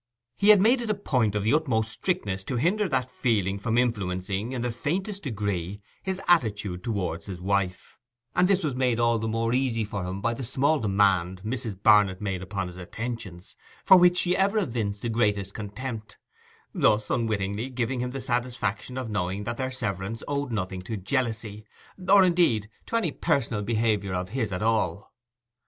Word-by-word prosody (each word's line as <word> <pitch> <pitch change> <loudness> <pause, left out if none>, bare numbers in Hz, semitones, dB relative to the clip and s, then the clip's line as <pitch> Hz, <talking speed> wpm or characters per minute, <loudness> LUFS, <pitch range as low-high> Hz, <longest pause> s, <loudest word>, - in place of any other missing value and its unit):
He 205 - +2
had 210 -2 +9
made 240 +6 +4
it 235 - -4
a 215 - +2
point 125 - 0
of 105 - 0
the 110 - +2
utmost 115 -8 +1
strictness 105 - -2
to 130 - -3
hinder 185 - +1
that 130 -3 0
feeling 100 -7 0
from 110 +3 0
influencing 100 -2 -1
in 125 -2 -3
the 120 - -1
faintest 190 - -3
degree 100 - -3 0.2
his 190 -1 -3
attitude 105 - +2
towards 90 -7 -3
his 95 -3 -6
wife; 95 -1 -2 0.4
and 180 - +4
this 195 -1 +2
was 150 -4 0
made 125 -2 +1
all 115 -1 +3
the 110 - -2
more 115 +1 0
easy 125 -3 +1
for 100 -2 -4
him 90 +2 -4
by 115 +3 0
the 130 - -6
small 140 +5 +2
demand 95 -3 +2
Mrs. 110 -4 -4
Barnet 105 -3 +5
made 95 -4 -3
upon 95 0 -3
his 90 0 -9
attentions, 95 -2 -6 0.3
for 190 - +9
which 180 0 +6
she 180 0 +2
ever 200 +3 +2
evinced 115 - -2
the 120 - -1
greatest 105 -4 0
contempt; 110 +2 -6 0.6
thus 105 -1 +2
unwittingly 110 0 -1
giving 125 0 -2
him 125 +1 -1
the 135 +1 -5
satisfaction 120 -1 -2
of 130 -2 -3
knowing 100 -1 -2
that 120 +2 -4
their 130 -1 -1
severance 105 -3 -4
owed 140 -2 -2
nothing 95 -3 -3
to 105 +4 -5
jealousy, 110 -1 -2 0.5
or, 200 0 +8
indeed, 170 - +3 0.2
to - - -3
any 210 -9 +1
personal 115 -7 0
behaviour 105 -3 0
of 90 0 -3
his 110 -2 -2
at 90 +3 -2
all. 110 -2 0
115 Hz, 180 wpm, -26 LUFS, 100-130 Hz, 0.6 s, had